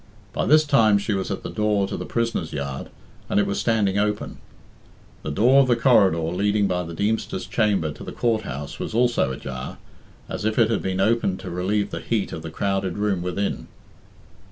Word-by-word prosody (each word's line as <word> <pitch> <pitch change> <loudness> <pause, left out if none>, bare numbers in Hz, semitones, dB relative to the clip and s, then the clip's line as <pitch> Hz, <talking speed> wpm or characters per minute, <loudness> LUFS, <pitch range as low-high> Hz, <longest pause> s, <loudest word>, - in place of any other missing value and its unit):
By - - -1
this 155 +1 +6
time 115 -8 +4
she 100 +1 -1
was 95 -1 -2
at - - -4
the - - -5
door 105 -2 +1
to 100 - -4
the - - -5
prisoners' 115 -8 -2
yard, 70 -2 -4 0.4
and - - +2
it 105 - +3
was 100 - -2
standing 105 -4 +1
open. 105 0 -2 0.8
The - - -5
door 125 - +5
of 135 - +2
the 120 - +4
corridor 115 -8 +4
leading 100 +6 +1
by 90 -2 0
the 85 -1 -7
Deemster's 105 -1 -1
chamber 100 -6 +1
to - - -10
the - - -7
Court 115 -2 0
house 70 -6 -6
was - - -4
also 120 - +2
ajar, 65 -1 -6 0.5
as - - -5
if 110 0 0
it 115 -2 +4
had 110 - 0
been 95 0 -2
opened 100 -2 +1
to 90 - -6
relieve 100 +3 -1
the - - -4
heat 110 -4 -1
of 80 - -5
the 80 - -6
crowded 95 +2 -1
room 105 -3 0
within. 90 +3 -2
100 Hz, 205 wpm, -23 LUFS, 90-110 Hz, 0.8 s, this